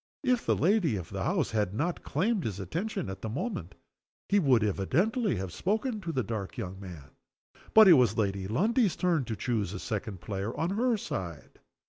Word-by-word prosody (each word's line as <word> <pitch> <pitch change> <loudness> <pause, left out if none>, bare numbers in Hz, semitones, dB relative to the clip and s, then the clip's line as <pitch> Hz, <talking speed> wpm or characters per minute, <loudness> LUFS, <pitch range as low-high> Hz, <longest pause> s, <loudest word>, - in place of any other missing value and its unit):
If 250 -1 +1
the - - +4
lady 180 - +2
of 90 -5 -6
the - - -3
house - - 0
had 105 -3 0
not 165 +8 -1
claimed 195 +5 0
his 100 -3 -3
attention 170 - -3
at 95 0 -6
the 110 - -4
moment 120 - -4 0.5
he 205 - +4
would 130 - +4
evidently 165 - +1
have 95 -2 -4
spoken 215 +3 -1
to 170 - -3
the 130 -5 0
dark 105 -2 -5
young 95 +1 -5
man. 85 -8 -10 0.6
But 220 -1 +10
it 180 - +10
was 125 -8 +4
Lady 100 -3 0
Lundie's 210 - +2
turn 170 -6 +1
to 110 - -3
choose 105 -5 -1
a 95 - -5
second 105 -2 -4
player 100 +3 -4
on 165 +3 0
her 235 +3 +1
side. 85 - -6
120 Hz, 190 wpm, -29 LUFS, -, 0.6 s, But